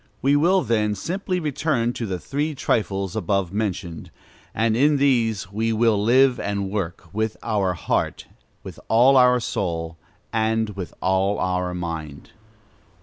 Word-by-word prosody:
We 140 +2 +4
will, 180 +6 +3
then, 105 -2 0
simply 180 - -3
return 145 -6 -1
to 115 - -4
the 95 -2 -2
three 145 - -3
trifles 100 -6 -1
above 100 -4 -1
mentioned; 95 -6 -3 0.4
and 110 0 +1
in 145 +4 +3
these 115 -8 +1
we 110 +2 -1
will 110 -2 +2
live 125 +2 +4
and 100 -1 -2
work 90 -4 -4
"with 110 +1 -2
all 110 -3 0
our 95 -2 +1
heart, 80 - -2 0.4
with - - -9
all 125 +4 +5
our 125 -1 +5
soul, 85 -7 -3 0.4
and 110 0 +1
with 95 -3 -6
all 95 +2 +1
our 90 -1 -1
mind." 80 -5 -6
110 Hz, 145 wpm, -23 LUFS, 95-125 Hz, 0.4 s, all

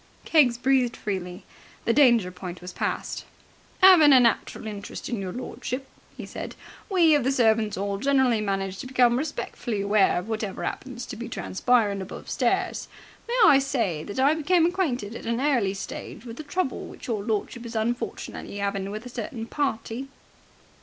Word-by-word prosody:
Keggs 265 -7 +4
breathed 255 -1 +2
freely. 185 -2 -5 0.4
The 230 - +3
danger 235 -9 +5
point 180 -1 -7
was 180 0 -9
past. - - -3 0.6
"'Aving 335 -7 +9
a 260 - +8
natural 235 -2 +1
interest, 205 -2 -6
your 195 -6 -3
lordship," 255 +3 -5 0.3
he - - -6
said, - - -7 0.3
"we 345 -5 +5
of 290 -3 +3
the 265 - +2
Servants' 220 -5 +2
'All 200 0 -2
generally 265 -3 +3
manage 195 -2 -2
to - - -6
become 250 -2 +4
respectfully 245 -5 -3
aware 200 -2 +3
of 180 +3 -4
whatever 215 -3 -3
'appens 245 -2 -5
to - - -7
be 235 +1 -6
transpirin' 210 -2 +1
above 190 - -8
stairs. - - 0 0.4
May 480 +1 -1
I 275 -8 +7
say 230 - -1
that 205 +5 -5
I 275 +3 +5
became 325 +2 +3
acquainted 280 - -1
at - - -7
an 230 +1 0
early 245 -9 +1
stage 195 +3 -7
with 230 0 -8
the - - -5
trouble 305 -1 -2
which - - -11
your 220 -4 -1
lordship 220 +2 -2
is 235 -1 -8
unfortunately 225 -2 -3
'aving 200 -1 -2
with 215 +3 -6
a - - -7
certain 230 -1 -5
party?" 255 -1 -2
235 Hz, 170 wpm, -26 LUFS, 200-270 Hz, 0.6 s, Aving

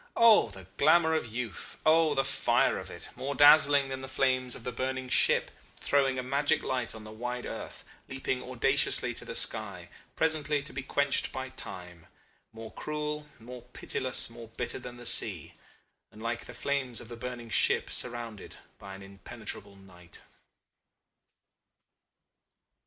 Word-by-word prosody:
Oh 225 - +6
the 95 -3 -11
glamour 160 +2 +5
of 120 -8 -1
youth! 115 -4 -5
Oh 155 -1 +4
the 135 - +2
fire 140 - +2
of - - -8
it, - - -9
more 140 +2 -4
dazzling 145 -1 +7
than 130 0 -5
the 130 - -7
flames 130 -1 0
of - - -10
the 125 - -3
burning 130 +1 -3
ship, - - +3 0.2
throwing 135 -2 +1
a 130 - -2
magic 140 +3 +1
light 125 -3 -2
on 110 - -10
the 110 - -10
wide 125 +3 -5
earth, - - -7 0.3
leaping 130 -1 -3
audaciously 130 +2 +1
to - - -3
the - - -6
sky, - - 0 0.3
presently 150 -2 +1
to - - -8
be 130 - -3
quenched 140 +1 0
by 130 0 -5
time, 90 -8 -8 0.4
more 110 0 -9
cruel, 150 0 -4
more 125 +2 -10
pitiless, 125 +1 -1
more 115 -1 -11
bitter 115 +3 -4
than 120 -1 -9
the 120 - -11
sea - - +3 0.6
and 110 +1 -12
like 115 0 -3
the 125 - -10
flames 130 -2 -2
of 120 - -10
the 120 - -8
burning 120 -1 -7
ship - - +3
surrounded 120 -4 -3 0.2
by 100 -1 -9
an 95 - -11
impenetrable 100 0 -9
night." 90 -3 -14
125 Hz, 155 wpm, -29 LUFS, 115-140 Hz, 0.6 s, dazzling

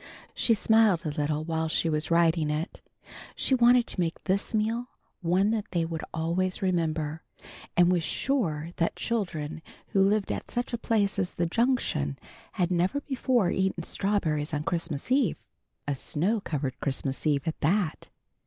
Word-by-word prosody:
She 230 - +3
smiled 215 -5 +3
a - - 0
little 150 0 -1
while 160 0 -1
she 165 - +1
was 155 -1 -1
writing 165 -2 +3
it. 150 +3 -3 0.5
She - - +1
wanted 245 -1 +5
to - - -5
make 170 -2 -1
this 195 +1 0
meal 225 +2 0 0.3
one 185 +4 +2
that 220 -1 -2
they 170 -2 0
would 165 -1 -4
always 180 +4 -1
remember, 160 -4 0 0.6
and 175 0 +6
was 180 -2 +2
sure 165 - -1
that 170 - 0
children 165 -10 -3 0.3
who 195 - +2
lived 200 +1 +2
at - - -4
such 245 +1 -2
a - - +1
place 205 -4 +1
as 180 -2 -1
the 170 - +1
Junction 175 - 0 0.4
had 180 -1 0
never 180 +11 +1
before 255 -8 +1
eaten 190 -3 0
strawberries 165 -7 -1
on 150 - -2
Christmas 165 - -3
eve; 260 - +3 0.5
a 145 - +1
snow 185 - -1
covered 140 -4 -3
Christmas 135 +1 -2
eve 145 +1 +1
at 160 - -2
that. 175 +1 0
175 Hz, 160 wpm, -28 LUFS, 155-210 Hz, 0.6 s, and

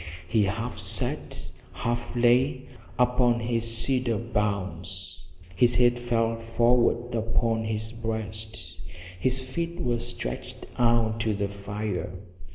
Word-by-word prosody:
He 105 +4 +3
half 110 +5 -3
sat, - - -3 0.2
half 120 +1 -2
lay, 125 +2 +3 0.3
upon 125 -1 +3
his 115 -1 +2
cedar 120 -1 +1
boughs; 100 -5 -3 0.3
his 120 +4 +4
head 120 0 +4
fell 115 -1 +1
forward 120 +1 +2
upon 115 0 +1
his 110 0 -1
breast, 110 -1 -5 0.4
his 130 +5 +1
feet 170 +7 -3
were 120 -7 0
stretched 120 - -5
out 115 -2 +3
to 110 -2 +1
the 100 0 0
fire. 100 -1 -4
115 Hz, 115 wpm, -27 LUFS, 110-120 Hz, 0.4 s, his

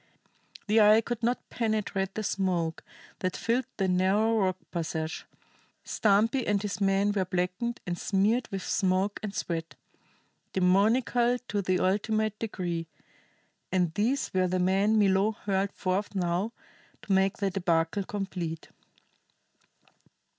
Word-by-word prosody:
The 215 +1 +4
eye 210 +1 +7
could 235 0 -4
not 240 +2 -1
penetrate 210 -4 -1
the 215 - -2
smoke 180 -5 -1 0.4
that 185 -1 -2
filled 235 +2 0
the 195 - +1
narrow 190 +5 +2
rock 185 -2 +1
passage; 160 -2 -3 0.6
Stumpy 220 +5 +2
and 205 -1 +2
his 205 0 -4
men 195 +1 +3
were 200 -2 +1
blackened 185 +6 -2
and 175 - -2
smeared 210 +5 +1
with 195 -3 -5
smoke 190 +2 0
and 205 -2 -5
sweat, 165 -1 -3 0.8
demoniacal 230 +6 +3
to 205 0 0
the 185 -1 +1
ultimate 215 +2 0
degree; 175 -6 -3 0.8
and 180 -3 +1
these 245 +9 0
were 185 -1 +2
the 185 +1 0
men 195 +4 +2
Milo 200 +1 +3
hurled 195 -1 -1
forth 195 +2 -2
now 180 +4 0 0.5
to 200 - -1
make 195 +3 +2
the 200 -1 0
débâcle 175 +1 0
complete. 180 -5 -4
195 Hz, 130 wpm, -28 LUFS, 185-215 Hz, 0.8 s, eye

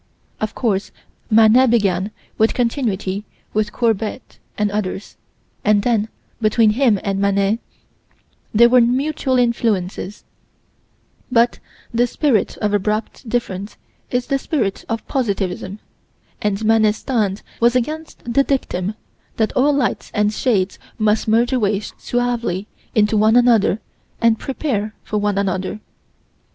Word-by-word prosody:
Of 215 0 -3
course, 210 -5 -1 0.4
Manet 225 +3 +6
began 200 -4 +2 0.3
with 220 +1 +2
continuity 215 -6 -1 0.3
with 210 -1 0
Courbet 225 0 -2 0.2
and 210 -1 +1
others, 205 -1 -4 0.5
and 210 -1 +3
then, 220 -2 +1 0.3
between 215 0 +4
him 230 -3 +3
and 195 -1 -1
Manet 200 +2 +2 0.9
there 235 +2 +6
were 250 +1 +5
mutual 260 +2 +1
influences 210 -5 -1 1.1
but 235 -1 +3 0.3
the 240 +1 +3
spirit 245 -5 +1
of 210 -1 -1
abrupt 215 +4 -2
difference 205 -4 -3 0.3
is 245 0 -1
the 275 -2 0
spirit 235 -10 -1
of 225 -1 -3
positivism, 200 -6 -2 0.6
and 210 +1 -1
Manet's 215 -1 +4
stand 215 -7 -1 0.2
was 240 +1 +3
against 310 +6 -3
the 275 - +4
dictum 215 -8 -1 0.4
that 220 -1 +1
all 280 +3 +3
lights 280 -3 -1
and 210 0 +2
shades 205 -6 0 0.2
must 215 0 +1
merge 235 +4 +3
away 210 -5 +1
suavely 235 -4 -2 0.3
into 215 0 +3
one 215 +2 +4
another 235 -4 +4 0.4
and 230 -1 +3
prepare 225 -7 -2
for 210 - -2
one 205 -1 0
another. 190 +1 -1
220 Hz, 125 wpm, -20 LUFS, 205-245 Hz, 1.1 s, Manet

